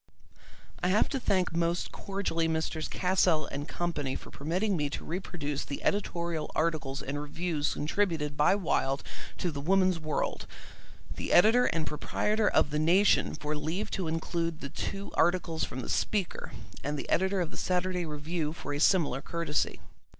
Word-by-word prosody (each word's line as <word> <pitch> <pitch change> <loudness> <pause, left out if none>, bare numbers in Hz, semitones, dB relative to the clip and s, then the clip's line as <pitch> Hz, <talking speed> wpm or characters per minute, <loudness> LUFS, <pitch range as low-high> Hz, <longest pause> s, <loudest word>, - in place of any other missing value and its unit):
I - - +2
have 195 +4 +3
to 275 - -1
thank 185 -7 +1
most 170 +1 0
cordially 195 -4 -1
Messrs. 160 -1 -1
Cassell 180 -4 +2
and 145 +2 -5
Company 150 -7 -2
for - - -8
permitting 185 +8 0
me 150 -3 0
to - - -5
reproduce 160 -5 -3
the 140 - -6
editorial 170 -5 -1
articles 155 -4 0
and 145 +2 -3
reviews 155 0 -1
contributed 155 -2 0
by 150 +6 +4
Wilde 140 -7 0 0.3
to 175 - -1
the 140 -2 -5
Woman's 185 +2 +3
World; 155 -1 -2 0.7
the - - -4
editor 225 +7 +6
and 165 -2 0
proprietor 210 +7 0
of 145 - +3
the 150 - 0
Nation 180 +6 +4
for 150 +1 -3
leave 160 +7 -2
to 185 -4 -2
include 165 0 -1
the 140 - -5
two 195 +7 -4
articles 170 -2 +2
from 130 - -5
the - - -6 0.2
Speaker; 200 -4 -3 0.3
and 145 +1 -2
the - - -5
editor 190 +1 +2
of 170 -3 -1
the - - -9
Saturday 180 0 0
Review 155 0 -3
for 145 - -5
a 145 - -2
similar 150 -6 +3
courtesy. 170 -3 -1
165 Hz, 165 wpm, -30 LUFS, 150-185 Hz, 0.7 s, editor